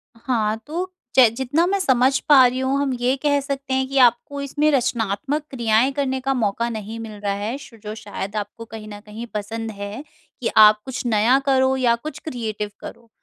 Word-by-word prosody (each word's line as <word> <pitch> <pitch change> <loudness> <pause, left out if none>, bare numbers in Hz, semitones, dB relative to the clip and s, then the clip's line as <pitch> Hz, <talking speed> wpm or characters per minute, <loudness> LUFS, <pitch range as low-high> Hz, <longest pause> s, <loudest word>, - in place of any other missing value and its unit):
हाँ, 225 -2 -1
तो 360 +4 -4 0.2
जै 250 -4 +7
जितना 265 +6 +1
मैं 395 +1 +1
समझ 265 -4 +3
पा 270 -3 +8
रही 250 +1 +1
हूँ, 265 +1 0
हम 270 -2 0
ये 250 +2 +2
कह 285 -1 +3
सकते 275 -1 -4
हैं 265 0 +1
कि 275 0 -3
आपको 255 +3 +3
इसमें 290 +2 +1
रचनात्मक 250 +2 0
क्रियाएँ 235 +1 +2
करने 265 -2 -1
का 270 +1 0
मौका 230 -1 0
नहीं 220 0 -6
मिल 225 -1 -7
रहा 200 -1 -1
है, 210 +6 -3
शो 260 -4 -13
जो 210 0 -7
शायद 205 -1 -6
आपको 210 +2 -5
कहीं 220 -1 -9
न 205 - -9
कहीं 215 +3 -7
पसंद 225 +2 -4
है 205 +7 -6 0.4
कि 230 - 0
आप 215 0 +8
कुछ 260 -1 -5
नया 230 +3 +4
करो 265 -1 +3
या 240 -3 +3
कुछ 300 +5 -8
क्रिएटिव 220 -7 -4
करो। 230 - -11
245 Hz, 200 wpm, -22 LUFS, 220-270 Hz, 0.4 s, पा